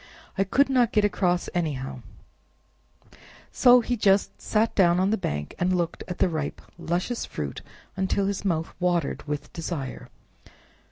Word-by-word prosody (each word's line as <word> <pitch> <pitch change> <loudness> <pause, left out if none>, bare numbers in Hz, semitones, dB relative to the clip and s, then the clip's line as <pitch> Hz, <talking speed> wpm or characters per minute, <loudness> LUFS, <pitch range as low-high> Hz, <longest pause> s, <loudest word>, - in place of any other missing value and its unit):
I 195 - +2
could 275 +9 +3
not 250 -4 +3
get 210 -1 +3
across 180 -3 +1
anyhow, 135 -7 -3 1.5
so 245 -1 +6
he 245 +2 -1
just 200 -3 +2
sat 220 +1 +1
down 175 -2 +4
on 190 +2 +2
the - - +3
bank 75 - -3
and 180 +1 +2
looked 170 -2 -2
at 180 - -5
the - - +3
ripe, 155 -4 -3 0.2
luscious 180 +8 -2
fruit 70 -2 -5 0.3
until 190 +1 0
his 200 0 -2
mouth 165 -4 -1
watered 175 -5 0
with 150 0 -4
desire. 160 -5 -5
180 Hz, 150 wpm, -26 LUFS, 160-205 Hz, 1.5 s, so